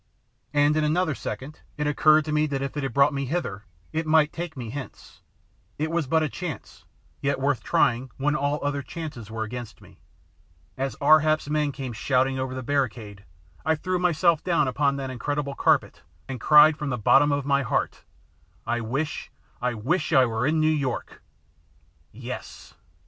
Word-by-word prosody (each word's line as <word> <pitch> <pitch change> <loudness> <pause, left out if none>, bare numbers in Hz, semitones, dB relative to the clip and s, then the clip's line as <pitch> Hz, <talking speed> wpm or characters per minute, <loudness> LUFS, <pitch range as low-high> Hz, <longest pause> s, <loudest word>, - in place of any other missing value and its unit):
And 145 +1 +3
in 155 - +1
another 160 +2 +1
second 140 +2 -7 0.2
it 150 - -1
occurred 155 +1 +4
to 155 - -3
me 150 0 +2
that 135 -2 -2
if 140 - -5
it 145 - -2
had 135 - -2
brought 140 +1 +4
me 140 0 -2
hither 125 - -3 0.3
it 160 0 -2
might 155 -1 +4
take 170 -3 -6
me 120 -3 -6
hence. 135 0 -9 0.6
It 155 +2 -2
was 165 -4 0
but 160 +3 +2
a - - +1
chance, 165 -1 -7 0.4
yet 140 0 0
worth 135 -1 0
trying 125 +3 +1
when 145 +2 +1
all 145 0 0
other 145 0 -1
chances 145 - -7
were 110 0 -3
against 120 +1 -7
me. - - -18 0.8
As 135 +1 -3
Ar 155 +2 +7
hap's 155 -1 0
men 150 -1 +1
came 135 -3 -6
shouting 130 +3 +1
over 130 0 -3
the 130 - -5
barricade 115 -7 -2 0.4
I 160 - +2
threw 185 +3 -2
myself 170 -2 +2
down 165 -6 +2
upon 140 +2 +1
that 135 -1 -4
incredible 140 +3 -3
carpet - - +1 0.3
and 130 -3 -6
cried 150 0 +7
from 150 - -3
the 125 - -1
bottom 135 +6 +4
of 140 -1 -1
my 140 0 +2
heart, 125 - -2 0.6
"I 120 +1 -1
wish 135 +7 -3 0.3
I 125 -1 -1
wish 140 - -1
I 130 - +6
were 115 +2 -1
in 155 +1 +2
New 155 - +3
York!" 140 -5 -3 0.9
Yes! 125 +3 -8
140 Hz, 180 wpm, -25 LUFS, 130-155 Hz, 0.9 s, Ar